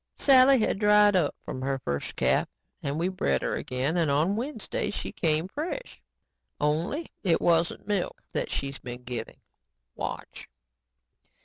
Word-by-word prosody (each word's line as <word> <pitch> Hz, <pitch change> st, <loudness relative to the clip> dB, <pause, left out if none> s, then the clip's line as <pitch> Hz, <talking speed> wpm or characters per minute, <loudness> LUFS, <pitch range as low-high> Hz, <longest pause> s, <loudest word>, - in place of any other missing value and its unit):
Sally 270 Hz, 0 st, +7 dB
had 215 Hz, -, 0 dB
dried 210 Hz, -1 st, +5 dB
up 165 Hz, -6 st, +2 dB
from 130 Hz, -, -5 dB
her 135 Hz, +1 st, -1 dB
first 70 Hz, -, -4 dB
calf -, -, +2 dB, 0.3 s
and 140 Hz, +1 st, -2 dB
we 170 Hz, +2 st, +1 dB
bred 185 Hz, 0 st, 0 dB
her -, -, -1 dB
again 130 Hz, +7 st, -1 dB
and 165 Hz, -3 st, +2 dB
on 155 Hz, +8 st, +2 dB
Wednesday 290 Hz, -, -3 dB
she -, -, -4 dB
came 160 Hz, 0 st, +1 dB
fresh. 330 Hz, -, -5 dB, 0.6 s
Only 165 Hz, -, -1 dB
it 175 Hz, -5 st, +3 dB
isn't 170 Hz, +2 st, +1 dB
milk 205 Hz, -4 st, -2 dB
that -, -, -1 dB
she's 140 Hz, 0 st, -3 dB
been 125 Hz, 0 st, -8 dB
giving. 120 Hz, -2 st, -6 dB, 0.6 s
Watch!" -, -, -6 dB
170 Hz, 145 wpm, -27 LUFS, 140-210 Hz, 0.6 s, Sally